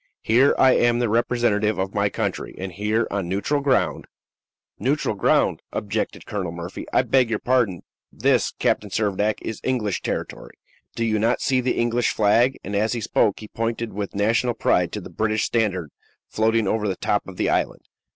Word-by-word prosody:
Here 125 +5 +4
I 130 - +6
am 120 -1 +3
the 120 -2 0
representative 110 -2 +1
of 95 +1 -2
my 100 -1 +1
country, - - -3
and 95 0 -5
here, 105 +5 0
on 100 -3 -2
neutral 100 +10 0
ground 140 -2 +1 0.4
" - - -54
"Neutral - - 0
ground?" - - +2
objected - - -3
Colonel 95 -5 -3
Murphy; 85 +1 -7
"I - - +3
beg 130 -3 +2
your 110 - 0
pardon. 120 -9 0 0.3
This, - - +1
Captain 105 - 0
Servadac, 105 +1 0
is 110 - -5
English 115 -7 -1
territory. - - -5 0.4
Do 115 - -1
you 110 -1 +1
not 115 +3 +2
see 130 -1 +1
the 125 0 -1
English 120 0 +1
flag?" 115 +5 +3
and, 100 +2 -4
as 110 +3 +1
he 120 - -3
spoke, 105 0 +1
he 110 - -8
pointed 115 +1 -3
with 100 0 -5
national 115 +4 +1
pride - - +1
to - - -4
the - - -10
British 110 -1 0
standard 95 -10 -1 0.4
floating 110 -1 +1
over 105 +1 0
the 95 - -1
top 105 +3 -1
of 95 -2 -10
the - - +1
island. - - -1
110 Hz, 185 wpm, -23 LUFS, 100-120 Hz, 0.4 s, I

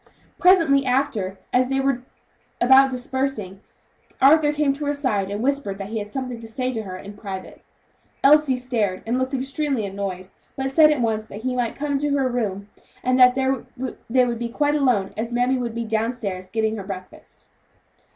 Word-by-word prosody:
Presently 330 -7 +5
after, 250 -7 0 0.2
as 250 0 +3
they 270 0 0
were 270 -2 0 0.6
about 265 +2 +6
dispersing, 250 -6 -3 0.6
Arthur 295 +2 +5
came 295 -2 +1
to 290 +2 -5
her 290 0 0
side 210 -9 -1
and 205 +3 -3
whispered 275 -8 -1
that 195 0 -6
he 220 0 -3
had 205 0 -7
something 255 -2 -4
to 230 - -9
say 255 +3 -3
to 225 - -2
her 185 -3 -7
in 200 +2 -10
private. 195 -2 -8 0.6
Elsie 290 -1 +5
started 230 -7 -2
and 240 +3 0
looked 260 +1 -1
extremely 270 -2 -1
annoyed, 190 -2 -5 0.3
but 265 0 -2
said 305 +2 +6
at 300 -4 +1
once 220 -2 -1
that 215 +1 -9
he 255 0 -1
might 245 -2 -1
come 285 -1 -1
to 285 0 0
her 270 -2 +1
room, 205 -5 -2 0.4
and 255 +1 +2
that 250 0 +7
there 265 -2 0 0.5
they 250 +1 +4
could 235 -1 -3
be 235 0 -3
quite 290 +4 +1
alone, 250 -10 +1
as 230 +2 -4
mammy 245 +2 +1
would 235 -2 -4
be 235 0 -3
down 220 +1 0
stairs 195 -6 -5
getting 220 +1 -1
her 200 - -5
breakfast. 185 -1 -10
250 Hz, 190 wpm, -23 LUFS, 215-270 Hz, 0.6 s, that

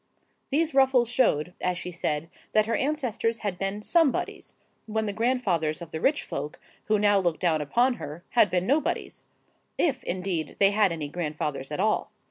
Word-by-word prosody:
These 305 +2 +1
ruffles 265 -3 +4
showed, 180 - +2
as 180 -1 0
she 180 - -5
said, 160 -2 -2 0.3
that 215 0 +4
her 230 - 0
ancestors 245 -6 -1
had 185 -3 -2
been 195 +2 -2
Somebodies, 325 +1 +1 0.3
when 220 0 -1
the 205 - -2
grandfathers 200 -10 0
of 170 -2 -9
the 160 - -5
rich 290 +1 +2
folk, 145 +2 -5 0.3
who 215 - +3
now 205 -1 +4
looked 175 -4 0
down 165 -4 +2
upon 240 - +2
her, 150 +4 -7
had 225 -4 +4
been 180 +1 0
Nobodies,—if, 280 - -2
indeed, 180 -3 -2
they 195 0 +5
had 205 -2 +3
any 160 -3 -3
grandfathers 150 -3 -4
at 150 - -3
all. 215 +2 +1
200 Hz, 170 wpm, -26 LUFS, 165-245 Hz, 0.3 s, they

